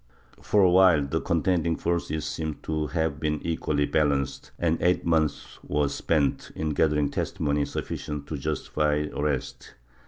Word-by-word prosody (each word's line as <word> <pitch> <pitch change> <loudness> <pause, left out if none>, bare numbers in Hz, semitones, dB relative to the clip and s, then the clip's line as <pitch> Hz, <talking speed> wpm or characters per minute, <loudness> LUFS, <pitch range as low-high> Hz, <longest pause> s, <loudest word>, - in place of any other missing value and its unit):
For 105 -2 +3
awhile 90 -5 +5
the 70 - -1
contending 85 0 +1
forces 80 -3 -2
seem 80 -2 -3
to 80 -1 -1
have 80 -3 -1
been 75 -1 -1
equally 75 -3 0
balanced 70 -3 0
and 85 -1 0
eight 90 +1 +2
months 80 -3 0
were 75 -1 0
spent 75 -2 0
in 80 0 -2
gathering 75 -1 +2
testimony 75 -1 -1
sufficient 75 -1 -5
to 75 - -5
justify 75 0 0
arrest. 75 -3 -3
75 Hz, 135 wpm, -26 LUFS, 75-80 Hz, -, awhile